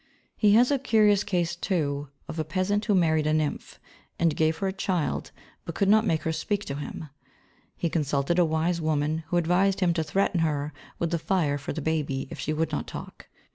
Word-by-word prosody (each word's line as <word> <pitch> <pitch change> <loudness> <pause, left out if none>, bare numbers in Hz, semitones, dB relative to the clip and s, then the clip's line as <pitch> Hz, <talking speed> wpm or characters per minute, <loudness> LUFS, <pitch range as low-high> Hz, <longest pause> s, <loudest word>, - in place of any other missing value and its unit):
He 210 -2 +4
has 245 +5 +5
a 280 - +2
curious 210 -5 +4
case, 175 -3 -1
too, 145 -6 -1 0.2
of 160 - -6
a - - +1
peasant 185 +6 0
who 210 - +2
married 160 -4 +2
a 155 - +2
nymph 155 -2 -2 0.4
and 165 -3 +2
gave 160 0 +1
her 195 - -2
a 190 - -2
child 185 -4 -1 0.3
but 170 - -7
could 195 - +2
not 215 +2 +5
make 160 -4 +1
her 160 - 0
speak 205 +5 -2
to 140 - -4
him. 150 +1 -6 0.7
He 170 - 0
consulted 150 +1 0
a - - +6
wise 165 +2 0
woman 155 0 0
who 175 - 0
advised 180 +3 +2
him 180 -3 +2
to 165 -1 0
threaten 180 +3 0
her 150 -2 -1 0.2
with 170 -1 -1
the 170 - 0
fire 155 -5 0
for 140 - -5
the 160 - -4
baby 145 -4 -1
if - - -7
she 155 - -2
would 160 +1 -1
not - - -3
talk. - - -9
165 Hz, 215 wpm, -26 LUFS, 155-190 Hz, 0.7 s, a